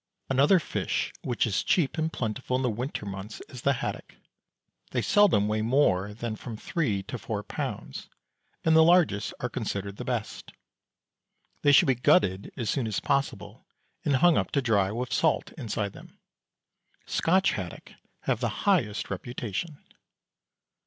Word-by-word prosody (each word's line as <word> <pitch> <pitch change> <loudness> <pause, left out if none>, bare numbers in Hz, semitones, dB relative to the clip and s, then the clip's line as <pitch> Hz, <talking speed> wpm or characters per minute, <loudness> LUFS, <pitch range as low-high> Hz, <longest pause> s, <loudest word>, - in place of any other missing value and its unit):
Another 140 +8 +5
fish 165 - -2
which 120 -2 0
is 105 -4 0
cheap 160 -7 +2
and 160 -1 -1
plentiful 125 +1 -2
in 130 - 0
the 125 - +1
winter 120 0 -4
months 100 +2 -7
is 125 - -9
the 140 - +3
haddock. - - -5 0.7
They - - -1
seldom 190 - +4
weigh 110 0 0
more 105 -5 +2
than 115 0 -4
from 115 -1 -7
three 110 - -1
to 120 - -6
four 105 -2 -4
pounds, - - -5 0.5
and 160 0 +4
the 160 - +8
largest 165 - +3
are 125 - 0
considered 100 -5 -4
the - - -5
best. 120 -4 -4 1.1
They 145 - +5
should 140 - +7
be 135 - +4
gutted 100 -5 +2
as 115 - -3
soon 125 -1 0
as 110 - -1
possible, 140 -7 -2 0.4
and 140 - +2
hung 170 +5 +5
up - - -2
to 140 - +3
dry 100 -5 +2
with 125 +3 -3
salt 160 -2 +1
inside 110 -6 -3
them. - - -14 0.9
Scotch 190 +3 +2
haddock 90 -4 -6 0.3
have 130 -4 0
the 120 -3 -3
highest 135 - +1
reputation. 125 - -5
120 Hz, 155 wpm, -27 LUFS, 105-145 Hz, 1.1 s, the